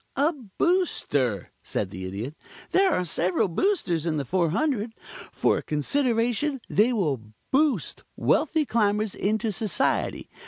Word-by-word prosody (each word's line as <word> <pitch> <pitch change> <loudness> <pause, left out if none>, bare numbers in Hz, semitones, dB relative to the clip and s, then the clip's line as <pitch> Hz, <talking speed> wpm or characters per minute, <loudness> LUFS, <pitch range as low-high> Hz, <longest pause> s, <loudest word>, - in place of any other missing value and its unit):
"A 290 +5 +2
Booster," 195 - 0
said 95 -3 -3
the 95 0 -6
Idiot. 105 +9 -5 0.4
"There 385 0 +4
are 180 - +1
several 175 +1 +1
Boosters 175 - 0
in 155 -2 0
the 140 - -2
400. 205 - 0 0.4
For - - +2
a - - -6
consideration 240 - 0
they 220 +5 +3
will 155 - 0 0.3
boost 290 +1 +1
wealthy 315 0 +2
Climbers 210 -3 +1
into 215 +2 0
Society. 210 +2 0
210 Hz, 125 wpm, -26 LUFS, -, 0.4 s, There